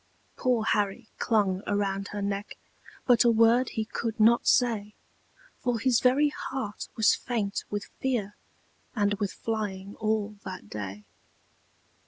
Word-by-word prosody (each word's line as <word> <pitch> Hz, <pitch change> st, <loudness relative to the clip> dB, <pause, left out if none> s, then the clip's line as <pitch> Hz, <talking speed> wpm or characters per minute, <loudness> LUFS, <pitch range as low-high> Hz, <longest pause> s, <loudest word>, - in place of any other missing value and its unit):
Poor 245 Hz, -3 st, +1 dB
Harry 210 Hz, +1 st, 0 dB
clung 200 Hz, -5 st, +1 dB
around 200 Hz, -1 st, -1 dB
her 205 Hz, -1 st, -4 dB
neck, 200 Hz, +1 st, -3 dB, 0.5 s
But 245 Hz, -3 st, +5 dB
a 240 Hz, -, +5 dB
word 230 Hz, +2 st, +4 dB
he 220 Hz, -, -2 dB
could 225 Hz, 0 st, -4 dB
not 230 Hz, +2 st, +5 dB
say, 220 Hz, -4 st, +2 dB, 0.6 s
For 245 Hz, -2 st, 0 dB
his 240 Hz, +1 st, +3 dB
very 275 Hz, +4 st, +4 dB
heart 260 Hz, -7 st, -5 dB
was 220 Hz, -2 st, +5 dB
faint 215 Hz, -5 st, -2 dB
with 205 Hz, -1 st, -3 dB
fear, 230 Hz, -6 st, -1 dB, 0.6 s
And 205 Hz, -2 st, +2 dB
with 200 Hz, -2 st, -1 dB
flying 205 Hz, -3 st, -4 dB
all 215 Hz, -1 st, -1 dB
that 185 Hz, -, -7 dB
day. 105 Hz, 0 st, -6 dB
215 Hz, 135 wpm, -28 LUFS, 200-235 Hz, 0.6 s, But